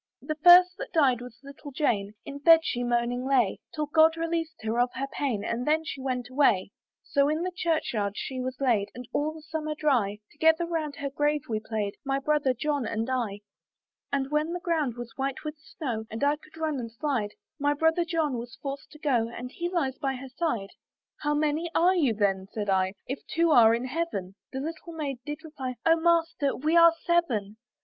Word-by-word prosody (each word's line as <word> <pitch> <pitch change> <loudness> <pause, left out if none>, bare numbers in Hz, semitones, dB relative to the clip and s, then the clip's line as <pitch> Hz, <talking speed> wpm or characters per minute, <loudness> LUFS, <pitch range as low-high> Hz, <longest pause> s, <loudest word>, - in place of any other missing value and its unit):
"The 310 - -2
first 355 +4 +8
that - - -6
died 265 -7 +3
was 245 -1 -10
little 280 +1 -10
Jane; 215 -8 0
"In 280 0 -7
bed 325 +3 +7
she 245 -4 -2
moaning 240 +1 0
lay, 255 -7 +2 0.2
"Till 305 -1 -1
God 320 +2 +4
released 330 -1 -2
her 225 +2 -1
of 245 +1 +3
her 270 - -2
pain, 240 -8 -1
"And 235 +4 -2
then 315 +1 +3
she 280 -4 -5
went 250 -2 -2
away. 245 -8 +2 0.3
"So 280 0 +2
in 310 +3 0
the 365 - -2
church 330 -7 0
yard 200 -3 -1
she 260 -1 -4
was 255 0 -4
laid, 230 -7 +2
"And 250 0 -8
all 300 +1 0
the 315 -1 -12
summer 310 -1 -4
dry, 245 -10 +1
"Together 320 +2 +3
round 320 -4 -3
her 280 -1 -4
grave 295 0 +1
we 220 -2 -1
played, 215 -2 -3
"My 270 -1 0
brother 285 -1 +1
John 285 -1 -1
and 225 +3 -2
I. 220 -6 -2 0.7
"And 275 0 -1
when 305 +3 0
the 355 - -3
ground 315 -9 0
was 240 -1 -7
white 275 +2 -2
with 305 0 -5
snow, 245 -7 -5
"And 225 +5 -4
I 290 +1 +4
could 310 +1 -18
run 310 -3 -1
and 230 -2 -6
slide, 230 -4 -2 0.3
"My 290 +1 +2
brother 320 +3 +2
John 320 -7 -1
was 235 0 -9
forced 275 0 -6
to - - -12
go, 250 -7 +1
"And 250 +2 -7
he 345 +4 -3
lies 280 -8 -1
by 270 -3 -1
her 260 +1 -8
side." 250 - -2 0.5
"How 295 0 0
many 305 +3 0
are 355 +3 +5
you 275 -11 +2
then," 195 -2 0
said 205 -2 -1
I, 190 0 +1
"If 265 +2 -4
they - - -10
two 335 -1 +4
are 230 -5 +7
in 240 +2 -3
Heaven?" 260 - -3 0.2
The 265 - -4
little 330 +3 -6
Maiden 285 -5 -4
did 295 +1 -5
reply, 270 -5 -5
"O 330 0 +6
Master! 330 -3 +1
we 310 +5 0
are 335 0 +8
seven." 235 - +1
280 Hz, 210 wpm, -27 LUFS, 240-315 Hz, 0.7 s, first